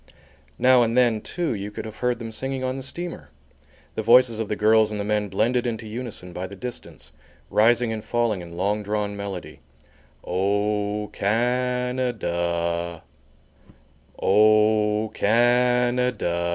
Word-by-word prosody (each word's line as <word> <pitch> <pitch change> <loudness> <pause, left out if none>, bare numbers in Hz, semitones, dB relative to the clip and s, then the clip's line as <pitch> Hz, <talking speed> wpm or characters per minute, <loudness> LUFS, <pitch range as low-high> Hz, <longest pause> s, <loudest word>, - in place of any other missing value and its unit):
Now 130 -1 +5
and 115 +1 +1
then, 120 -4 +3
too, 175 +3 -2
you 100 -1 -5
could 105 - -7
have 110 -1 -9
heard 125 -1 0
them 115 -1 -7
singing 135 +3 -4
on 130 0 -1
the 135 - -5
steamer, 170 +6 -6 0.6
the - - -3
voices 115 0 +5
of 110 - -2
the 105 - -2
girls 110 +1 +4
and 105 -1 -4
the 100 - -2
men 105 -1 0
blended 120 +6 +1
into 115 -1 -4
unison 110 -5 -7
by 90 +2 -4
the 100 - -10
distance, 125 +4 -8 0.4
rising 115 +1 +3
and 110 -1 -5
falling 115 -5 0
in 85 -1 -10
long 105 +3 0
drawn 105 0 -2
melody: 100 -3 -7 0.6
"O 105 +2 -1
Can 125 +4 0
a 125 -1 +1
da 85 -3 -2 1.2
O 105 +1 +3
Can 125 +2 +3
a 125 0 +2
da." 85 -6 -2
110 Hz, 150 wpm, -24 LUFS, 100-125 Hz, 1.2 s, Now